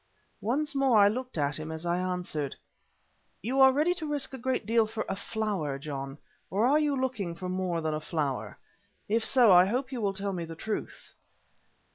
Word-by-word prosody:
Once 290 Hz, +8 st, -1 dB
more 270 Hz, -4 st, +3 dB
I 200 Hz, -1 st, +7 dB
looked 250 Hz, +1 st, -3 dB
at 145 Hz, 0 st, 0 dB
him 155 Hz, +1 st, -5 dB
as 160 Hz, +1 st, -6 dB
I 175 Hz, +1 st, +1 dB
answered: 180 Hz, -6 st, -3 dB, 0.9 s
"You 255 Hz, +5 st, 0 dB
are 265 Hz, 0 st, +9 dB
ready 305 Hz, +6 st, +2 dB
to 335 Hz, -4 st, -6 dB
risk 290 Hz, -2 st, -1 dB
a -, -, -5 dB
great 255 Hz, -2 st, -1 dB
deal 225 Hz, 0 st, +3 dB
for 220 Hz, 0 st, -4 dB
a 195 Hz, -, -2 dB
flower, 195 Hz, -9 st, -2 dB
John. 140 Hz, -1 st, -6 dB, 0.3 s
Or 205 Hz, +4 st, +1 dB
are 285 Hz, +4 st, +4 dB
you 290 Hz, -3 st, +1 dB
looking 220 Hz, -10 st, -2 dB
for 180 Hz, +2 st, -6 dB
more 180 Hz, -2 st, -1 dB
than 155 Hz, -1 st, -1 dB
a 155 Hz, -, -3 dB
flower? 150 Hz, -4 st, -3 dB, 0.5 s
If 220 Hz, +2 st, +1 dB
so, 245 Hz, -5 st, +5 dB
I 180 Hz, 0 st, +8 dB
hope 255 Hz, +6 st, -2 dB
you 250 Hz, -3 st, -4 dB
will 200 Hz, -2 st, 0 dB
tell 195 Hz, 0 st, -2 dB
me 175 Hz, -2 st, -3 dB
the 165 Hz, 0 st, -7 dB
truth." 215 Hz, +6 st, -5 dB
205 Hz, 200 wpm, -29 LUFS, 170-255 Hz, 0.9 s, are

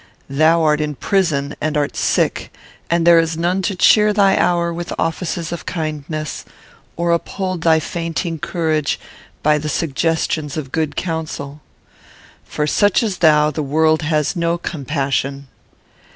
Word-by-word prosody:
Thou 160 Hz, +4 st, +3 dB
art 150 Hz, -1 st, +2 dB
in 150 Hz, -1 st, -2 dB
prison 155 Hz, -6 st, 0 dB
and 155 Hz, 0 st, -1 dB
art 145 Hz, -1 st, -1 dB
sick; -, -, 0 dB, 0.4 s
and 170 Hz, -1 st, +1 dB
there 170 Hz, -1 st, +7 dB
is 165 Hz, -1 st, -1 dB
none 175 Hz, +3 st, 0 dB
to 195 Hz, +1 st, -1 dB
cheer 210 Hz, +3 st, +5 dB
thy 195 Hz, -2 st, +4 dB
hour 170 Hz, -1 st, +1 dB
with 175 Hz, +1 st, -5 dB
offices 165 Hz, 0 st, -2 dB
of 170 Hz, -, -6 dB
kindness, 155 Hz, -2 st, -4 dB, 0.5 s
or 170 Hz, 0 st, +1 dB
uphold 185 Hz, +1 st, -2 dB
thy 160 Hz, -1 st, +4 dB
fainting 165 Hz, +1 st, -3 dB
courage 155 Hz, -3 st, -1 dB, 0.4 s
by 150 Hz, 0 st, +3 dB
the 150 Hz, +1 st, -4 dB
suggestions 155 Hz, 0 st, -1 dB
of 135 Hz, -4 st, -5 dB
good 155 Hz, -1 st, -1 dB
counsel. 155 Hz, -4 st, -4 dB, 0.8 s
For 150 Hz, -, -2 dB
such 205 Hz, +8 st, +2 dB
as 200 Hz, -5 st, -2 dB
thou 150 Hz, -2 st, +4 dB
the 155 Hz, -, -3 dB
world 155 Hz, +2 st, +2 dB
has 155 Hz, +1 st, 0 dB
no 170 Hz, 0 st, 0 dB
compassion. 140 Hz, -3 st, -3 dB
160 Hz, 145 wpm, -19 LUFS, 150-170 Hz, 0.8 s, there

